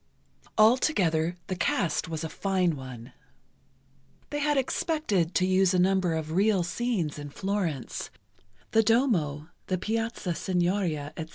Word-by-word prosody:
Altogether, 190 Hz, -, +3 dB
the 185 Hz, -, -3 dB
cast 170 Hz, -3 st, 0 dB
was 160 Hz, -1 st, -4 dB
a 160 Hz, -, -3 dB
fine 185 Hz, -3 st, 0 dB
one. 130 Hz, -2 st, -9 dB, 1.2 s
They 290 Hz, -, -2 dB
had 295 Hz, 0 st, +1 dB
expected 260 Hz, -, 0 dB
to 185 Hz, -, +3 dB
use 185 Hz, 0 st, +3 dB
a -, -, +3 dB
number 185 Hz, -2 st, +2 dB
of 155 Hz, -1 st, -4 dB
real 195 Hz, +1 st, +3 dB
scenes 175 Hz, -6 st, -2 dB
in 145 Hz, 0 st, -7 dB
Florence—the 190 Hz, -, -3 dB
Duomo, 195 Hz, -, +1 dB, 0.2 s
the 185 Hz, -, 0 dB
Piazza 225 Hz, -2 st, -2 dB
Signoria, 175 Hz, -4 st, -1 dB
etc. 160 Hz, -1 st, -6 dB
185 Hz, 125 wpm, -28 LUFS, 160-215 Hz, 1.2 s, Altogether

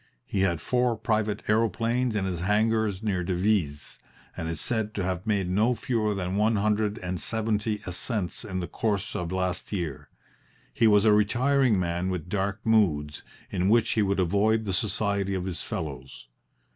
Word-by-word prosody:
He 100 Hz, -, -2 dB
had 85 Hz, -4 st, +1 dB
four 125 Hz, -2 st, +1 dB
private 110 Hz, -2 st, -1 dB
aeroplanes 115 Hz, +2 st, +1 dB
in 100 Hz, -2 st, 0 dB
his 90 Hz, -3 st, -2 dB
hangars 105 Hz, +1 st, +1 dB
near 95 Hz, -4 st, 0 dB
Devizes, 90 Hz, -5 st, -1 dB, 0.4 s
and 80 Hz, -1 st, -4 dB
is 80 Hz, -2 st, -4 dB
said 110 Hz, -3 st, -1 dB
to 100 Hz, -, -1 dB
have 90 Hz, +2 st, -3 dB
made 100 Hz, -4 st, +1 dB
no 110 Hz, +7 st, +2 dB
fewer 110 Hz, -2 st, -1 dB
than 95 Hz, 0 st, -2 dB
one 110 Hz, +2 st, +3 dB
hundred 105 Hz, +1 st, +1 dB
and 90 Hz, -2 st, -4 dB
seventy 110 Hz, -1 st, -1 dB
ascents 90 Hz, +2 st, -2 dB
in 95 Hz, -4 st, -4 dB
the 85 Hz, -, -4 dB
course 105 Hz, -3 st, -2 dB
of 85 Hz, -1 st, -3 dB
last 90 Hz, -1 st, -2 dB
year. 85 Hz, -9 st, -4 dB, 0.6 s
He 115 Hz, -, +3 dB
was 105 Hz, 0 st, +5 dB
a 105 Hz, -, +6 dB
retiring 120 Hz, +2 st, +3 dB
man 85 Hz, +1 st, -1 dB
with 90 Hz, -2 st, -4 dB
dark 100 Hz, +1 st, -1 dB
moods, 80 Hz, -10 st, +2 dB, 0.3 s
in 95 Hz, 0 st, +1 dB
which 115 Hz, +1 st, +3 dB
he 110 Hz, -, +2 dB
would 100 Hz, -1 st, +1 dB
avoid 105 Hz, +5 st, +2 dB
the 95 Hz, -, -2 dB
society 100 Hz, 0 st, -1 dB
of 90 Hz, -1 st, -3 dB
his 90 Hz, -4 st, -4 dB
fellows. 65 Hz, -5 st, -6 dB
100 Hz, 170 wpm, -27 LUFS, 90-110 Hz, 0.6 s, a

